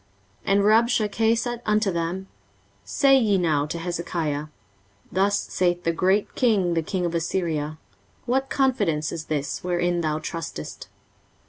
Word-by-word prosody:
23:036:004 - - +2
And 200 - +4
Rabshakeh 225 0 +3
said 240 0 -3
unto 215 -1 +2
them, 175 +3 -3 0.6
Say 270 -1 +4
ye 210 -5 +2
now 155 -5 +1
to 170 - -4
Hezekiah, 165 -3 -3 0.6
Thus 200 +2 +2
saith 175 -2 -1
the 165 - +2
great 190 +5 +1
king, 200 -8 +2
the 165 - +1
king 180 +3 -2
of 170 - -2
Assyria, 160 -3 -1 0.5
What 265 +2 0
confidence 205 - +1
is 165 -2 -5
this 145 -2 -3
wherein 175 -1 0
thou 155 -2 0
trustest? 155 - -6
180 Hz, 140 wpm, -24 LUFS, 165-215 Hz, 0.6 s, And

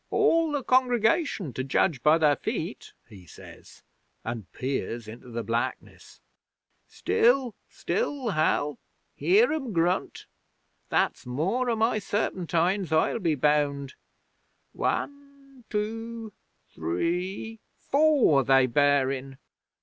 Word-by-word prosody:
'"All 330 -1 +2
the 290 -2 -2
congregation, 245 - +1
to 130 - -3
judge 135 +1 +1
by 155 +4 +5
their 150 -3 +3
feet," - - -5
he 95 -4 -15
says, - - -14 0.4
and 115 -4 -6
peers 120 -3 -4
into 120 +3 -11
the 115 0 -4
blackness. 115 +2 -4 0.7
"Still! 245 0 +2 0.2
Still, 290 - -2
Hal! 155 -4 0 0.3
Hear 415 +1 +3
'em 270 -8 -4
grunt! 175 +2 -1 0.6
That's - - 0
more 190 - -1
o' 230 - +1
my 220 0 +1
serpentines, 185 -2 -1
I'll 160 +8 +2
be 165 -6 +1
bound. 145 -1 0 0.8
One 280 -3 -5
two 225 +1 -4 0.4
three 180 - -3 0.3
four 280 - +4
they 135 0 +4
bear 140 +1 +3
in! 135 0 -6
175 Hz, 110 wpm, -26 LUFS, -, 0.8 s, by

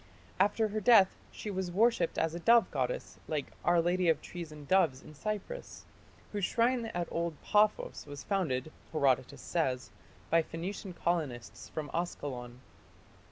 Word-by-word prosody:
After 210 +3 +3
her 215 +1 -2
death 205 -4 +6 0.2
she 210 - -6
was 190 -2 -2
worshipped 205 -3 +2
as 160 0 +1
a 170 - -4
dove 230 +6 +5
goddess - - -2
like 150 -3 -2
"Our 175 0 +4
Lady 175 +1 +2
of 160 - +3
Trees 170 -3 -7
and 150 -2 -11
Doves" 165 -9 +3
in 155 - -12
Cyprus, 215 - -5 0.5
whose 205 -2 -3
shrine 235 +3 +2
at 175 -5 -2
old 170 -2 -2
Paphos 210 -6 +2
was 145 -1 -7
founded, 155 -8 -1 0.2
Herodotus 135 -4 +1
says, 130 -7 -1 0.4
by 165 +1 +6
Phoenician 180 +4 -5
colonists 155 -9 -2
from 150 -2 -5
Askalon. 130 -8 -4
175 Hz, 150 wpm, -32 LUFS, 150-205 Hz, 0.5 s, death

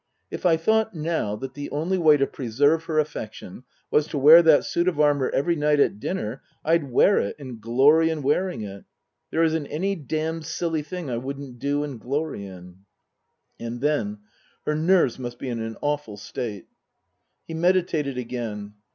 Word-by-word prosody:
If - - -1
I 165 -2 +4
thought 220 +4 +1
now 155 -9 -1
that 130 +4 -7
the 145 +1 -6
only 170 +6 -1
way 155 -3 +6
to 135 - +2
preserve 145 +7 +1
her 160 -2 -2
affection 125 -6 -4 0.3
was 150 0 +3
to 150 - -4
wear 155 +5 +9
that 160 -3 +5
suit 170 +1 0
of 170 -5 0
armour 145 -3 +3
every 170 +5 +1
night 150 -1 +2
at 105 - +2
dinner 130 - -4 0.2
I'd 160 -3 +2
wear 195 +11 +5
it 100 - -2
and 130 -6 -9
glory 140 +8 +4
in 160 -3 -3
wearing 175 - 0
it. 100 -1 -9 0.4
There 165 - +1
isn't 160 -2 0
any 190 +6 -1
damned 160 0 -3
silly 165 -1 -1
thing 165 -2 -6
I 120 - -1
wouldn't 135 0 -7
do 145 +2 0
and 140 -5 -6
glory 140 -6 -3
in." 90 -1 -12 0.8
And 115 +1 -5
then 110 -8 -1 0.2
" - - -37
Her 150 - +1
nerves 160 -5 +3
must 120 -1 -6
be 130 - -5
in 115 -2 -3
an 115 0 -5
awful 145 -8 -2
state." 105 0 -6 0.8
He 165 - -6
meditated 165 -5 +1
again. 115 -4 -5
145 Hz, 180 wpm, -24 LUFS, 120-160 Hz, 0.8 s, wear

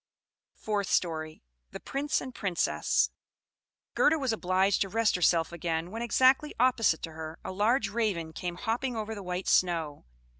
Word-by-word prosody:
FOURTH 205 -3 -2
STORY. 155 -2 -1 0.3
The - - -8
Prince 285 +2 -2
and 260 - -7
Princess 190 -7 0 0.8
Gerda 315 +2 +4
was 265 -6 -1
obliged 190 -1 +1
to 195 - +1
rest 225 +2 +2
herself 170 -2 +2
again, 170 0 -3
when, 225 +2 -5
exactly 260 +5 +3
opposite 235 -9 +3
to 165 - -5
her, 160 0 -7
a - - -4
large 215 +4 +2
Raven 200 -7 -2
came 175 +1 -4
hopping 235 +6 -2
over 220 0 -4
the 205 - -7
white 180 0 -4
snow. 165 - +1
195 Hz, 155 wpm, -29 LUFS, 170-230 Hz, 0.8 s, Gerda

